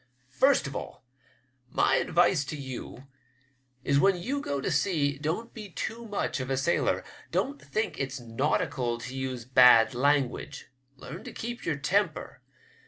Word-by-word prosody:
First 265 Hz, -, +3 dB
of 140 Hz, -1 st, -6 dB
all, -, -, -7 dB, 0.6 s
my -, -, +3 dB
advice 170 Hz, -2 st, +3 dB
to 150 Hz, -, -5 dB
you 130 Hz, -1 st, -7 dB, 0.8 s
is 140 Hz, 0 st, +3 dB
when 195 Hz, +3 st, +4 dB
you 270 Hz, +11 st, -2 dB
go 140 Hz, -, -2 dB
to -, -, -2 dB
sea 145 Hz, -7 st, +1 dB
don't 165 Hz, +10 st, -3 dB
be 215 Hz, -3 st, -8 dB
too 230 Hz, +6 st, -5 dB
much 205 Hz, -8 st, -2 dB
of 130 Hz, 0 st, -4 dB
a 135 Hz, -, 0 dB
sailor. 145 Hz, +6 st, +1 dB, 0.3 s
Don't 280 Hz, +2 st, -1 dB
think 215 Hz, -, -3 dB
it's 135 Hz, 0 st, -3 dB
nautical 120 Hz, 0 st, -1 dB
to 125 Hz, +2 st, -7 dB
use 130 Hz, -3 st, -4 dB
bad 125 Hz, -1 st, +7 dB
language. 140 Hz, +1 st, 0 dB, 0.3 s
Learn 140 Hz, +6 st, -9 dB
to -, -, -7 dB
keep 240 Hz, +1 st, -6 dB
your 165 Hz, -, +1 dB
temper. 200 Hz, +8 st, -1 dB
140 Hz, 155 wpm, -28 LUFS, 130-195 Hz, 0.8 s, bad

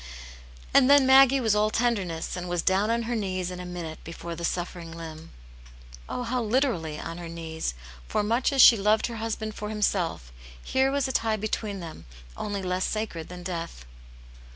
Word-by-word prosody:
And 270 Hz, -1 st, +6 dB
then 285 Hz, -1 st, +7 dB
Maggie 270 Hz, 0 st, +7 dB
was 225 Hz, -4 st, +2 dB
all 210 Hz, 0 st, +3 dB
tenderness 200 Hz, -9 st, -1 dB
and 180 Hz, -1 st, -5 dB
was 175 Hz, -1 st, -1 dB
down 195 Hz, +3 st, +2 dB
on 230 Hz, 0 st, +1 dB
her 240 Hz, +1 st, -2 dB
knees 185 Hz, -4 st, -2 dB
in 180 Hz, -, -7 dB
a 180 Hz, -, -6 dB
minute 170 Hz, -3 st, -7 dB
before 170 Hz, +1 st, -7 dB
the 170 Hz, -, -7 dB
suffering 175 Hz, -1 st, -3 dB
limb; 165 Hz, -1 st, -9 dB, 0.8 s
oh, 250 Hz, -, -3 dB
how 245 Hz, +1 st, -1 dB
literally 215 Hz, -, 0 dB
on 165 Hz, +1 st, -6 dB
her 170 Hz, -1 st, -7 dB
knees, 160 Hz, -, -4 dB, 0.3 s
for 210 Hz, -, 0 dB
much 235 Hz, +7 st, +1 dB
as 270 Hz, -2 st, +6 dB
she 230 Hz, -, +9 dB
loved 210 Hz, +2 st, +2 dB
her 235 Hz, -1 st, -5 dB
husband 220 Hz, -1 st, -3 dB
for 210 Hz, 0 st, -6 dB
himself, 180 Hz, -, -1 dB, 0.3 s
here 265 Hz, -, +1 dB
was 280 Hz, -1 st, 0 dB
a -, -, -2 dB
tie 225 Hz, -3 st, +1 dB
between 210 Hz, -2 st, -3 dB
them 160 Hz, -, -9 dB, 0.3 s
only 200 Hz, -2 st, -4 dB
less 185 Hz, 0 st, -1 dB
sacred 215 Hz, -7 st, -3 dB
than 180 Hz, 0 st, -8 dB
death. 170 Hz, -, -5 dB
200 Hz, 185 wpm, -27 LUFS, 170-230 Hz, 0.8 s, she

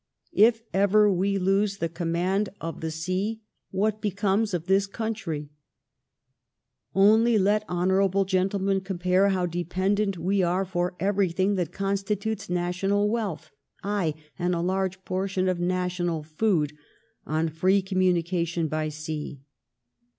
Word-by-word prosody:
If 225 Hz, +1 st, +4 dB
ever 200 Hz, +1 st, +4 dB
we 195 Hz, +2 st, +1 dB
lose 195 Hz, +2 st, +1 dB
the 170 Hz, -, -1 dB
command 175 Hz, +4 st, -1 dB
of 165 Hz, 0 st, -6 dB
the 160 Hz, -, -2 dB
sea, 185 Hz, +7 st, -3 dB, 0.3 s
what 210 Hz, +2 st, 0 dB
becomes 205 Hz, +1 st, 0 dB
of 175 Hz, -3 st, -2 dB
this 195 Hz, +1 st, +2 dB
country? 195 Hz, -9 st, -4 dB, 1.4 s
Only 220 Hz, +4 st, +5 dB
let 210 Hz, +2 st, +2 dB
hon. 190 Hz, +2 st, +2 dB
gentlemen 195 Hz, +1 st, +1 dB
compare 185 Hz, +1 st, +1 dB
how 185 Hz, -2 st, +1 dB
dependent 185 Hz, +3 st, -1 dB
we 190 Hz, +4 st, +1 dB
are 180 Hz, +2 st, +1 dB
for 180 Hz, 0 st, -2 dB
everything 190 Hz, 0 st, +1 dB
that 180 Hz, -5 st, -1 dB
constitutes 200 Hz, +1 st, -2 dB
national 185 Hz, +4 st, 0 dB
wealth 195 Hz, -9 st, -3 dB, 0.2 s
— -, -, -36 dB, 0.2 s
aye, 160 Hz, -5 st, 0 dB, 0.2 s
and 175 Hz, 0 st, +1 dB
a 170 Hz, -, -1 dB
large 190 Hz, +1 st, -1 dB
portion 185 Hz, 0 st, -1 dB
of 180 Hz, -1 st, 0 dB
national 175 Hz, -2 st, -1 dB
food, 155 Hz, -2 st, 0 dB, 0.5 s
on 160 Hz, +2 st, 0 dB
free 185 Hz, +5 st, +2 dB
commimication 175 Hz, -3 st, 0 dB
by 155 Hz, 0 st, -2 dB
sea. 150 Hz, -2 st, -6 dB
190 Hz, 130 wpm, -26 LUFS, 175-200 Hz, 1.4 s, Only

